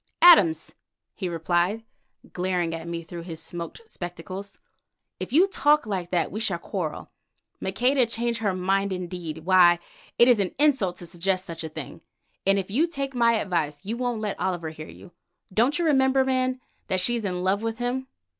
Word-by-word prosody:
"Adams," 180 Hz, -, +6 dB, 0.4 s
he 185 Hz, -4 st, -4 dB
replied, 175 Hz, +6 st, 0 dB, 0.5 s
glaring 180 Hz, -2 st, -1 dB
at 165 Hz, 0 st, -6 dB
me 170 Hz, 0 st, -4 dB
through 170 Hz, +1 st, -8 dB
his 165 Hz, -2 st, -7 dB
smoked 170 Hz, -, -7 dB
spectacles, 185 Hz, -, -7 dB, 0.6 s
"If -, -, -5 dB
you 330 Hz, +8 st, +6 dB
talk 300 Hz, -7 st, +3 dB
like 190 Hz, -5 st, -3 dB
that 175 Hz, -2 st, 0 dB
we 215 Hz, -, -4 dB
shall 195 Hz, -6 st, 0 dB
quarrel. 170 Hz, -2 st, -5 dB, 0.5 s
Maqueda 245 Hz, +6 st, +2 dB
change 235 Hz, 0 st, -1 dB
her 200 Hz, -4 st, 0 dB
mind 195 Hz, +2 st, 0 dB
indeed! 175 Hz, -3 st, -5 dB
Why, 180 Hz, -2 st, +6 dB, 0.4 s
it 235 Hz, -, +7 dB
is 245 Hz, -4 st, +5 dB
an 195 Hz, -2 st, -1 dB
insult 270 Hz, -11 st, +2 dB
to 180 Hz, -, -9 dB
suggest 185 Hz, +2 st, -1 dB
such 165 Hz, -1 st, -6 dB
a 160 Hz, -, -4 dB
thing, 155 Hz, -, -8 dB, 0.5 s
and 195 Hz, 0 st, +5 dB
if 195 Hz, 0 st, -3 dB
you 300 Hz, +10 st, +2 dB
take 275 Hz, -4 st, -4 dB
my 235 Hz, -2 st, +4 dB
advice 170 Hz, -9 st, -1 dB
you 220 Hz, +3 st, -2 dB
won't 245 Hz, -2 st, -2 dB
let 210 Hz, -2 st, -3 dB
Oliver 175 Hz, -4 st, -2 dB
hear 155 Hz, 0 st, -9 dB
you. 180 Hz, -, -13 dB, 0.4 s
Don't 245 Hz, +8 st, +3 dB
you 345 Hz, -, 0 dB
remember, 265 Hz, -3 st, +3 dB
man, 255 Hz, -1 st, 0 dB, 0.3 s
that 185 Hz, -, +1 dB
she's 235 Hz, +4 st, +2 dB
in 180 Hz, -2 st, -2 dB
love 195 Hz, +2 st, +1 dB
with 225 Hz, 0 st, -3 dB
him?" 250 Hz, +2 st, -2 dB
195 Hz, 180 wpm, -25 LUFS, 175-240 Hz, 0.6 s, it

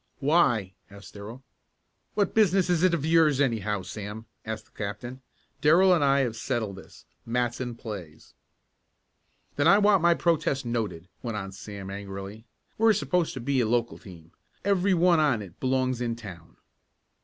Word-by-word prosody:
"Why?" 135 Hz, -, +2 dB, 0.2 s
asked 100 Hz, 0 st, -13 dB
Darrell. 110 Hz, +6 st, -9 dB, 0.7 s
"What 200 Hz, -3 st, +1 dB
business 195 Hz, -4 st, +3 dB
is 170 Hz, -2 st, +2 dB
it 180 Hz, -2 st, +4 dB
of 150 Hz, -3 st, -3 dB
yours, 160 Hz, -4 st, +4 dB
anyhow, 105 Hz, -7 st, 0 dB
Sam?" 105 Hz, +3 st, -7 dB, 0.2 s
asked 110 Hz, -1 st, -5 dB
the -, -, -30 dB
captain. 110 Hz, +5 st, -6 dB, 0.4 s
"Darrell 180 Hz, +5 st, +6 dB
and 165 Hz, -5 st, +2 dB
I 140 Hz, 0 st, +4 dB
have 120 Hz, -4 st, -1 dB
settled 110 Hz, -3 st, -3 dB
this. 95 Hz, -, -14 dB, 0.2 s
Matson 120 Hz, +1 st, -2 dB
plays." 95 Hz, -9 st, -9 dB, 1.2 s
"Then 145 Hz, +2 st, +3 dB
I 195 Hz, -, +7 dB
want 205 Hz, -3 st, +4 dB
my 170 Hz, 0 st, +4 dB
protest 150 Hz, -6 st, 0 dB
noted!" 105 Hz, -8 st, -3 dB
went 115 Hz, -3 st, -4 dB
on 95 Hz, -1 st, -5 dB
Sam 95 Hz, 0 st, -8 dB
angrily. 100 Hz, +2 st, -7 dB, 0.3 s
"We're 225 Hz, 0 st, +5 dB
supposed 180 Hz, -6 st, 0 dB
to -, -, -4 dB
be 130 Hz, +1 st, 0 dB
a 115 Hz, -, +1 dB
local 120 Hz, 0 st, 0 dB
team 85 Hz, -6 st, -14 dB, 0.3 s
every 195 Hz, -1 st, +2 dB
one 175 Hz, -1 st, +4 dB
on 130 Hz, -9 st, +2 dB
it 90 Hz, -4 st, -14 dB
belongs 130 Hz, -1 st, 0 dB
in 120 Hz, -1 st, -1 dB
town." 90 Hz, -8 st, -11 dB
120 Hz, 160 wpm, -27 LUFS, 105-160 Hz, 1.2 s, I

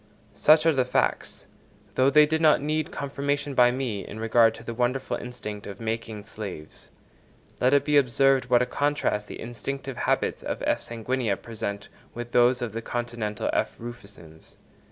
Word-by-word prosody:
Such 155 Hz, +1 st, +5 dB
are 165 Hz, -, +5 dB
the 130 Hz, -2 st, +2 dB
facts, 125 Hz, -, -1 dB, 0.5 s
though 130 Hz, +1 st, +4 dB
they 150 Hz, +2 st, +7 dB
did 160 Hz, +1 st, 0 dB
not 155 Hz, -2 st, +5 dB
need 155 Hz, +2 st, -1 dB
confirmation 140 Hz, 0 st, -2 dB
by 125 Hz, -2 st, +6 dB
me, 125 Hz, -5 st, -2 dB
in 110 Hz, -, -9 dB
regard 115 Hz, 0 st, +4 dB
to -, -, -12 dB
the 115 Hz, -, -5 dB
wonderful 125 Hz, +3 st, -1 dB
instinct 105 Hz, -4 st, -7 dB
of 100 Hz, -, -8 dB
making 110 Hz, -2 st, -4 dB
slaves. 100 Hz, -7 st, -9 dB, 0.7 s
Let 130 Hz, +3 st, +4 dB
it 140 Hz, -, +2 dB
be 150 Hz, -1 st, +3 dB
observed 135 Hz, 0 st, +3 dB
what 125 Hz, 0 st, +4 dB
a -, -, 0 dB
contrast 145 Hz, -7 st, -1 dB
the -, -, -8 dB
instinctive 130 Hz, +3 st, -5 dB
habits -, -, 0 dB
of -, -, -4 dB
F. -, -, +1 dB
sanguinea 115 Hz, -2 st, -2 dB
present 105 Hz, -3 st, -5 dB, 0.3 s
with 120 Hz, 0 st, -6 dB
those 125 Hz, +1 st, +4 dB
of 115 Hz, -3 st, -4 dB
the 115 Hz, -, -4 dB
continental 120 Hz, -3 st, -3 dB
F. -, -, 0 dB
rufescens. 100 Hz, -9 st, -11 dB
120 Hz, 170 wpm, -26 LUFS, 110-135 Hz, 0.7 s, they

